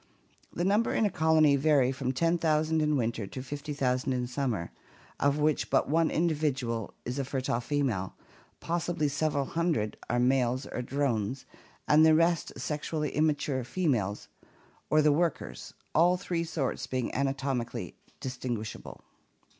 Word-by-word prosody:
The 175 - -2
numbers 210 +4 +2
in 220 - +3
a 205 - +1
colony 155 -3 +4
vary 140 -3 +3
from 130 -1 -2
ten 165 +5 +1
thousand 160 0 +2
in 150 -1 +2
winter 115 -4 -1
to 130 +6 -7
fifty 145 +2 -6
thousand 130 -2 0
in 125 -1 -1
summer, 120 -8 -2 0.5
of 140 +1 +2
which 150 0 +1
but - - +2
one 160 +1 +3
individual 140 - -1
is 125 +3 -3
a - - 0
fertile 130 -2 -1
female, 120 -9 -1 0.4
possibly 170 -2 -1
several 145 0 0
hundred 160 -10 -1
are 120 - +1
male 125 0 +2
or - - -3
drones, 130 -2 -1 0.4
and 155 +1 +6
the 160 0 +6
rest 165 0 +2
sexually 150 0 -2
immature 145 -3 0
females 120 - -1 0.6
or 155 0 +4
the 150 - +5
workers, 165 +1 -2 0.2
all 175 +3 +4
three 175 -3 -2
sorts 155 -5 -2
being 130 -2 -2
anatomically 135 -2 -2 0.2
distinguishable. 125 -4 -5
140 Hz, 145 wpm, -29 LUFS, 125-155 Hz, 0.6 s, and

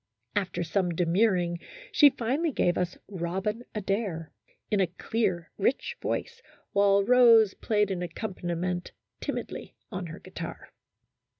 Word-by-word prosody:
After 190 -3 0
some 180 -1 0
demurring, 175 0 +2 0.3
she 290 - +8
finally 275 +7 0
gave 175 -8 +2
us 180 0 -1
" - - -50
Robin 195 +7 -2
Adair 195 -5 -2 0.2
" - - -39
in 210 - +3
a 190 - +3
clear, 180 -1 -2
rich 270 - 0
voice, 475 0 -3 0.3
while 200 0 +4
Rose 230 -4 +7
played 210 -2 +1
an 180 -2 -2
accompaniment 180 -1 -3 0.3
timidly - - -5 0.2
on 185 -3 -4
her 165 +2 -8
guitar. - - -8
195 Hz, 130 wpm, -28 LUFS, 175-225 Hz, 0.3 s, she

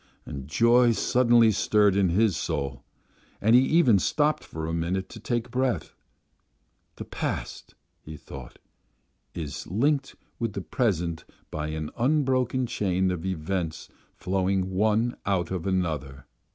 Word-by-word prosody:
And 70 -1 -7
joy 120 +7 +4
suddenly 120 +1 +4
stirred 105 -1 +3
in 100 -2 +3
his 100 +2 +2
soul, 70 -3 -3 0.6
and 110 +2 +3
he 125 - +8
even 130 - +4
stopped 150 - +1
for 80 0 -6
a 80 - -3
minute 90 +3 -2
to - - -10
take 120 -1 -2
breath. 125 - -1 1.0
"The - - -7
past," - - -5 0.3
he 80 0 -9
thought, 65 -4 -11 0.8
"is 75 -5 -5
linked 135 - 0 0.2
with 115 -4 -2
the 100 - -4
present 85 -7 -1 0.3
by 75 0 -3
an 80 0 -4
unbroken 130 -1 +1
chain 95 -6 0
of 90 0 -4
events 85 -2 -3 0.3
flowing 95 0 -1
one 110 +5 +1
out 95 -4 0
of 95 -1 -3
another." 75 -8 -2
95 Hz, 135 wpm, -26 LUFS, 80-120 Hz, 1.0 s, he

